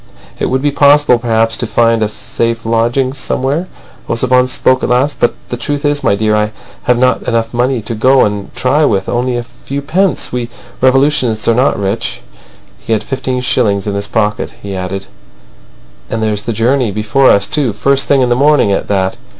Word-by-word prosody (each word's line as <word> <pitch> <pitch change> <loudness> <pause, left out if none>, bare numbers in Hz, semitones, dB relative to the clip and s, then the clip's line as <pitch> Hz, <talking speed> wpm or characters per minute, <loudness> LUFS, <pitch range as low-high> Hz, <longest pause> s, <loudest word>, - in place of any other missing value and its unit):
"It - - 0
would 130 +1 -1
be 145 - +2
possible 145 -3 +4
perhaps 115 -1 +1
to 120 - -2
find 115 0 +2
a 105 - +1
safe 115 +2 -3
lodging 120 +4 0
somewhere," 140 +5 -2 0.4
Ossipon 125 +2 +2
spoke 130 0 +1
at - - -2
last. 130 +4 +1
"But 120 - +1
the 120 - -4
truth 145 +4 -3
is, 145 0 0
my 100 - +2
dear, 105 +1 +1
I 105 0 0 0.3
have 125 - +3
not 125 +1 +2
enough 115 -1 -1
money 125 -1 0
to 115 - -3
go 130 +4 +4
and 105 -1 -4
try 140 +4 +1
with—only 120 +2 0
a 120 - -3
few 135 +3 -7
pence. 185 +6 0
We 120 -1 -3 0.3
revolutionists 130 -4 +2
are 115 - +4
not 125 +4 +2
rich." 100 +3 -3 0.6
He 115 - -2
had 110 - 0
fifteen 130 -1 -3
shillings 105 -6 +1
in 105 - -2
his 100 0 -2
pocket. 105 -1 -1
He 100 -1 -5
added: 95 +1 -4 1.0
"And 110 -1 -2
there's 105 -1 -1
the - - +1
journey 120 +2 +1
before 110 +7 +2
us, 100 0 +4
too—first 135 0 +1
thing 140 -2 +3
in 125 - +2
the 120 - +2
morning 140 -5 +3
at 95 - -1
that." 95 -2 -1
120 Hz, 190 wpm, -13 LUFS, 110-130 Hz, 1.0 s, possible